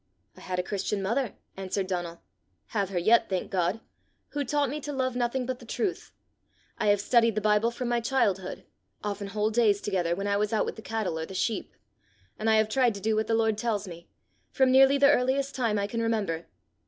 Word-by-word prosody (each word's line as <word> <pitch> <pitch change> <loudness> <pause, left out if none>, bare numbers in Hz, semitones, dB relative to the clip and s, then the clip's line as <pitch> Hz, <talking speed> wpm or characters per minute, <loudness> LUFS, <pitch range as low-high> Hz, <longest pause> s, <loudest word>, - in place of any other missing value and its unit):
"I - - -15
had 185 -1 -4
a 180 - 0
Christian 200 +1 -2
mother," 230 +4 -1 0.2
answered 195 0 -2
Donal, 175 -2 -4 0.2
" 90 -2 -46
have 200 -2 +1
her 190 - -3
yet, 225 +6 +4
thank 185 -2 -2
God! 185 +4 0 0.5
who 290 0 -2
taught 285 0 0
me 300 +1 -4
to 295 - -5
love 260 -2 -1
nothing 245 +1 -1
but 255 0 -4
the - - -13
truth; 375 - -3 0.7
I - - 0
have 205 0 +4
studied 230 +1 +3
the - - +2
Bible 210 +2 +3
from 240 +1 -4
my 240 0 +1
childhood, 205 -7 0 0.4
often 205 -1 -3
whole 210 +2 -1
days 215 -3 +3
together, 180 -5 -1
when 195 +2 -4
I 200 0 +1
was 210 +1 0
out 215 - +2
with - - -4
the - - -10
cattle 215 -8 -2
or 160 - -4
the 190 - -9
sheep; 215 +2 -2 0.6
and 220 +1 0
I 220 - +5
have 220 0 +3
tried 240 0 +2
to - - -6
do 220 +2 0
what 215 0 0
the 225 - +2
Lord 220 -1 +1
tells 215 -4 -1
me, 170 -1 -10 0.4
from 265 -1 +3
nearly 270 +1 +6
the 280 +1 +6
earliest 270 +1 +1
time 230 -5 0
I 200 - 0
can 230 +3 -3
remember. 205 -8 -1
215 Hz, 225 wpm, -28 LUFS, 195-245 Hz, 0.7 s, nearly